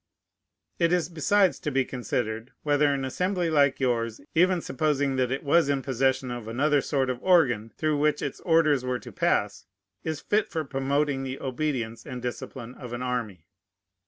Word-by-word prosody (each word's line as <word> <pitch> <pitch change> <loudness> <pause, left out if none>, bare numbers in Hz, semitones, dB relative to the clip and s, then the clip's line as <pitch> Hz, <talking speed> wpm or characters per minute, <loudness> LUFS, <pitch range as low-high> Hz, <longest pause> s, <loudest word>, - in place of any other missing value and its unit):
It 170 -1 +3
is 175 -3 +1
besides 185 +4 +2
to 150 - -2
be 135 -2 +1
considered, 120 -2 -3
whether 145 -1 +3
an 135 -1 -1
Assembly 180 +4 -1
like 140 -3 +3
yours, 115 -4 0
even 180 +2 +4
supposing 145 -2 0
that 130 -1 +1
it 135 - -2
was 155 +1 +3
in 140 -2 0
possession 130 -1 0
of 120 -2 -6
another 140 +5 +2
sort 135 -2 0
of 125 0 -6
organ, 125 - +3
through 155 -2 0
which 150 0 +1
its - - -4
orders 160 -6 +3
were 125 -1 -1
to - - -11
pass, - - 0 0.4
is 155 -2 -3
fit 210 +5 +1
for 160 -2 -3
promoting 140 +1 0
the 135 0 -5
obedience 130 -4 -3
and 125 - -6
discipline 125 0 -6
of 125 -2 -9
an 120 +1 -4
army. 115 -9 -3
135 Hz, 175 wpm, -26 LUFS, 125-155 Hz, 0.4 s, even